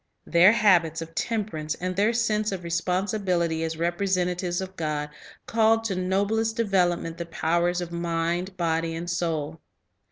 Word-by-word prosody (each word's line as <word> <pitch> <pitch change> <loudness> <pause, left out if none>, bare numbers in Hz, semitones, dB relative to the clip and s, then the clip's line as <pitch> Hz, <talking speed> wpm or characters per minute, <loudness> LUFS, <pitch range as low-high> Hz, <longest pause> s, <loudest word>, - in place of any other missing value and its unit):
Their 175 +4 +6
habits 175 -8 +3
of 165 0 -13
temperance 195 -9 -2
and 185 +1 -4
their 205 +4 +3
sense 215 -2 0
of 190 -2 -4
respon 175 +2 0
sibility 180 -5 0
as 160 0 -3
representatives 180 0 0
of 190 0 -6
God 150 -2 -3 0.3
called 225 0 +3
to 210 -4 -2
noblest 200 +5 0
de 230 - +1
velopment 175 -4 +1
the 170 - -5
powers 170 +2 0
of 175 - -4
body, 170 0 -4
mind, 170 +2 -1
and 165 0 -1
soul. 165 -3 -2
175 Hz, 155 wpm, -26 LUFS, 165-200 Hz, 0.3 s, Their